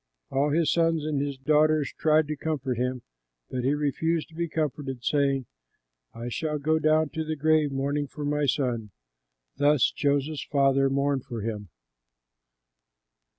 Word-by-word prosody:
All 140 +2 +2
his 160 +1 +2
sons 165 -2 +1
and 150 -3 0
his 140 -1 -3
daughters 150 +1 +2
tried 155 -1 +3
to 155 - -2
comfort 135 -5 -2
him, 125 0 -2 0.5
but 125 -1 -2
he 135 +3 +2
refused 155 +3 -1
to - - -19
be 170 +1 -2
comforted, 145 -5 -3
saying, 140 -2 +1 0.7
"I 115 +1 -7
shall 150 +5 -2
go 155 +2 +1
down 155 0 +3
to 160 +1 -3
the 155 0 -3
grave 155 0 +2
mourning 140 +2 -1
for 145 +2 -6
my 145 0 0
son." 120 -5 -1 0.7
Thus 145 -4 +4
Joseph's 145 +1 0
father 135 -1 +2
mourned 140 -1 0
for 120 -5 -5
him. 105 -3 -4
145 Hz, 150 wpm, -27 LUFS, 135-155 Hz, 0.7 s, Thus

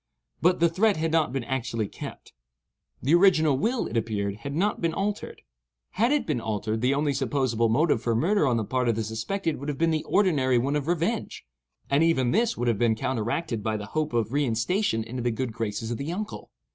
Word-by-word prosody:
But 180 +2 +3
the 170 - +5
threat 195 +4 +2
had 160 0 -1
not 160 -6 +2
been 135 -1 -2
actually 115 -3 -2
kept; - - -9 0.7
the 140 +6 +2
original 170 -5 +5
will, 230 - 0
it 115 - -6
appeared, 105 -3 -1
had 140 +5 -6
not 205 +6 0
been 165 -1 0
altered. 205 +1 -3 0.5
Had 235 +6 +1
it 295 -1 +1
been 140 -7 -1
altered, 110 0 -2
the 130 +3 +2
only 145 0 +1
supposable 130 -3 0
motive 145 0 +2
for 115 -1 0
murder 170 - +2
on 120 -2 +2
the 110 - 0
part 125 +2 0
of 115 - +2
the 110 - -1
suspected 150 - -2
would 140 +2 -5
have 145 - -3
been 165 +2 +2
the 155 -1 0
ordinary 145 -11 +2
one 135 +5 0
of 150 0 -2
revenge; 175 +7 -1 0.4
and 140 +2 +2
even 130 -7 +2
this 230 +4 +1
would 120 - -1
have 115 -4 +1
been 115 -2 +3
counteracted 115 +2 -2
by 110 +1 -1
the 105 - -6
hope 155 -1 0
of 115 -2 0
reinstation 130 - +1
into 120 +3 -5
the 120 - +1
good 120 0 -3
graces 110 0 -3
of 120 - -3
the 145 +4 -3
uncle. 210 +4 -5
135 Hz, 215 wpm, -26 LUFS, 115-165 Hz, 0.7 s, the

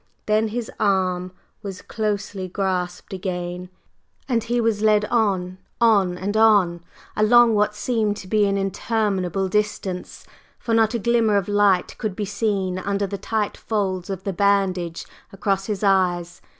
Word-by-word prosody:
Then 215 +1 +2
his 230 +1 -4
arm 185 -3 +1 0.3
was 195 -2 -7
closely 205 -3 -3
grasped 185 0 -3
again, 180 -1 -4 0.6
and 235 -4 0
he 240 +1 -1
was 225 -3 +1
led 210 -1 +3
on, 190 -5 0 0.2
on 200 -6 +3
and 200 +3 -3
on, 200 -6 +4 0.3
along 230 +2 +5
what 210 0 +1
seemed 215 -2 0
to 190 - -9
be 210 +1 +2
an 200 0 0
interminable 195 -2 -1
distance, 190 -2 -3 0.3
for 230 - -3
not 225 0 +3
a - - +2
glimmer 230 -2 +2
of 195 - -1
light 205 -3 +2
could 215 -5 -3
be 205 - -3
seen 200 -3 -1
under 200 +1 -1
the 200 0 -5
tight 215 +1 -2
folds 190 -4 -2
of 190 -1 -4
the 195 - -2
bandage 185 -3 0 0.3
across 195 0 -1
his 210 -2 -3
eyes. 180 -3 +1
200 Hz, 150 wpm, -22 LUFS, 185-215 Hz, 0.6 s, along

